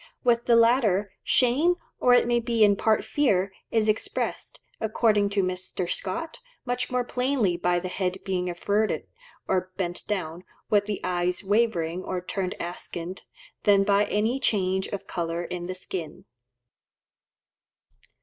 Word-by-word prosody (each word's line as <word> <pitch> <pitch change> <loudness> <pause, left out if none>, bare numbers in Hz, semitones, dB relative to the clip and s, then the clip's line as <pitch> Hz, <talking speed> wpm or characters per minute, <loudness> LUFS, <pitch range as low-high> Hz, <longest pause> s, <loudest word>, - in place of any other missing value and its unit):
With 235 -1 +3
the 235 - +5
latter, 230 -4 +3
shame, 280 +8 +3 0.2
or 245 0 +5
it 245 - +4
may 240 0 +2
be 230 -1 +2
in 205 -1 +5
part 220 +2 +1
fear, 195 -10 +1 0.2
is 220 -1 +1
expressed, 215 0 -2 0.2
according 215 -2 +2
to 200 -1 +1
Mr. 185 0 -2
Scott, 325 - -3 0.3
much 245 0 -1
more 250 -1 0
plainly 250 -6 0
by 175 0 +1
the 185 - -5
head 185 0 -2
being 180 -2 -1
averted 205 +5 0 0.4
or 185 0 0
bent 175 -2 -3
down, 180 -4 -3 0.3
with 205 -1 +4
the 210 -1 -3
eyes 180 0 0
wavering 190 -5 +1
or 185 - -3
turned 185 +1 -3
askant, 175 +1 -6 0.4
than 200 -1 +5
by 200 +1 +3
any 220 +5 0
change 190 -6 +1
of 200 - -5
colour 170 0 -3
in 175 0 -5
the 185 - -4
skin. 180 -3 -6
200 Hz, 145 wpm, -26 LUFS, 180-230 Hz, 0.4 s, the